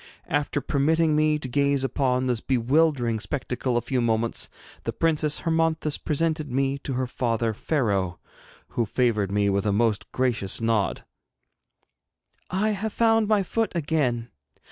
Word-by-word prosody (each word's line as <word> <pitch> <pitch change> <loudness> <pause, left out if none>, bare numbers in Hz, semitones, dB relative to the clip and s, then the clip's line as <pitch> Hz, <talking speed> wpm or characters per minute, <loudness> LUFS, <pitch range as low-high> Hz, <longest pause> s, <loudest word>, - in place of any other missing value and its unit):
After 145 -2 0
permitting 155 +3 +2
me 155 0 +3
to 150 - -5
gaze 140 +1 +1
upon 130 -1 0
this 120 -3 0
bewildering 130 -2 +2
spectacle 125 0 -2
a - - +1
few 125 +2 -1
moments, 115 0 0 0.3
the - - -2
Princess 155 -2 +1
Hermonthis 160 -2 0
presented 155 0 0
me 135 +2 0
to 135 - -4
her 130 +1 0
father 115 -2 -1
Pharaoh, 100 - -1 0.5
who 115 -2 -1
favoured 110 -5 +1
me 100 0 +2
with 100 +1 +1
a - - +2
most 110 0 0
gracious 120 -7 +1
nod. 115 -3 0 1.4
'I 195 +4 +1
have 215 +1 -2
found 225 -2 +3
my 210 -2 +3
foot 225 +4 -1
again! 135 -7 0
135 Hz, 145 wpm, -25 LUFS, 115-155 Hz, 1.4 s, me